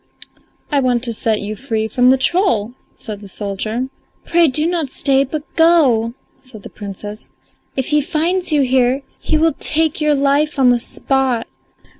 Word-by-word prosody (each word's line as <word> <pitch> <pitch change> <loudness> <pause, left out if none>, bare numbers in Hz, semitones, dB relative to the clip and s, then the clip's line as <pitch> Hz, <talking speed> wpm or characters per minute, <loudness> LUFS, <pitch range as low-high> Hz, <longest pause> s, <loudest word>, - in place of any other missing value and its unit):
"I 285 - +3
want 250 -2 +1
to 235 -2 0
set 220 -1 0
you 210 +1 -4
free 220 -2 -2
from 245 +2 +3
the 265 - +5
troll," 255 - +1 0.2
said 210 -4 -8
the 205 - -10
soldier. 215 +6 -4 0.4
"Pray 335 -1 +3
do 300 +3 +2
not 335 -4 -1
stay, 270 0 +2
but 295 +2 -5
go," 270 -9 +3 0.2
said 250 -6 -8
the - - -10
Princess. 205 +1 -8 0.5
"If 265 - -1
he 300 -1 +3
finds 335 +5 -1
you 295 -2 +3
here 260 +1 +2 0.2
he 315 - 0
will 325 +1 +2
take 320 0 +1
your 300 -1 +3
life 285 +2 +1
on 255 -2 +5
the 245 - +2
spot." 260 -1 -1
265 Hz, 170 wpm, -17 LUFS, 230-300 Hz, 0.5 s, the